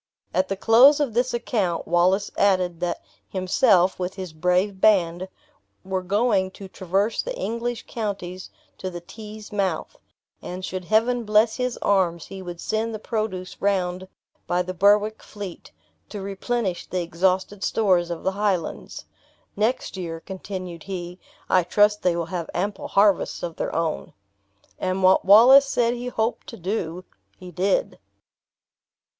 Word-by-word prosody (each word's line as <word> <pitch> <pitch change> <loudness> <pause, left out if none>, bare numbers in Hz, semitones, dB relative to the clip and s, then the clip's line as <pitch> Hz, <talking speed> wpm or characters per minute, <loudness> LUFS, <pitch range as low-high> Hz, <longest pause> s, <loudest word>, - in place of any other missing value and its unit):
At 185 +2 +1
the 195 - -3
close 245 +8 +6
of 280 -6 0
this 245 +2 +1
account, 205 -8 -1
Wallace 185 +4 +2
added, 185 -4 +2
that 175 0 -3 0.3
himself, 185 0 +3
with 180 +1 -3
his 185 -4 -7
brave 180 +4 0
band, 185 -3 +3 0.6
were 190 0 -2
going 200 0 +1
to 195 - -9
traverse 190 +4 -1
the - - -5
English 235 - -3
counties 190 -5 -5 0.3
to 185 - -4
the 175 -1 -7
Tees' 215 +3 -11
mouth; 190 -6 -2 0.5
and 185 +1 -6
should 185 -1 -5
Heaven 230 +4 +2
bless 215 +1 +3
his 250 -1 -2
arms, 180 -5 +1
he 195 -1 -9
would 175 -2 -8
send 220 +3 -2
the - - -3
produce 215 -4 -4
round 185 -2 0 0.4
by 180 +1 +1
the 185 +1 -5
Berwick 205 +4 +3
fleet, 200 -4 -9 0.4
to 210 - -6
replenish 195 -1 -3
the 180 0 -2
exhausted 185 +3 0
stores 185 -6 +2
of 170 -1 -5
the 190 - +1
Highlands. 195 -4 -2 0.5
"Next 220 0 -1
year," 165 -3 -5
continued 185 -2 -7
he, 180 -1 -6 0.3
"I 185 - +4
trust 210 +4 +3
they 180 -2 +2
will 170 -1 -2
have 170 -1 -5
ample 200 +4 -2
harvests 200 -1 +2
of 170 -2 -5
their - - -3
own." 165 -1 -2 0.7
And 185 0 -1
what 185 0 +5
Wallace 250 +8 +8
said 240 -3 +1
he 245 0 -5
hoped 225 -1 -2
to 230 - -9
do, 180 -2 -3 0.3
he 180 -1 -10
did. 195 - 0
190 Hz, 150 wpm, -24 LUFS, 180-215 Hz, 0.7 s, Wallace